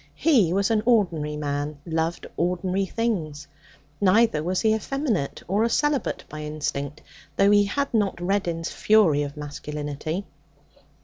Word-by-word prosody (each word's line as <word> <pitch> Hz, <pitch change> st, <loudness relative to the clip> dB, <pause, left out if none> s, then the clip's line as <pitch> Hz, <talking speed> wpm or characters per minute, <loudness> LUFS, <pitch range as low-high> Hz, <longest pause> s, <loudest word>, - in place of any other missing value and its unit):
He 240 Hz, -, +3 dB
was 195 Hz, +3 st, +1 dB
an 220 Hz, -1 st, +3 dB
ordinary 170 Hz, -10 st, +2 dB
man, 145 Hz, 0 st, -3 dB
loved 165 Hz, 0 st, -2 dB
ordinary 180 Hz, +3 st, 0 dB
things. 170 Hz, -11 st, -2 dB, 0.6 s
Neither 205 Hz, -4 st, +4 dB
was 180 Hz, +3 st, -1 dB
he 220 Hz, -1 st, +3 dB
effeminate 220 Hz, -, -2 dB
or 200 Hz, +4 st, +1 dB
a 230 Hz, -, +2 dB
celibate 295 Hz, +2 st, 0 dB
by 150 Hz, 0 st, -8 dB
instinct, 150 Hz, -1 st, -4 dB, 0.3 s
though 200 Hz, +1 st, +5 dB
he 205 Hz, 0 st, +5 dB
had 280 Hz, +8 st, -2 dB
not 205 Hz, -5 st, +1 dB
Reddin's 175 Hz, -3 st, -1 dB
fury 200 Hz, -9 st, +4 dB
of 145 Hz, 0 st, -5 dB
masculinity. 150 Hz, +4 st, -5 dB
180 Hz, 135 wpm, -25 LUFS, 150-215 Hz, 0.6 s, though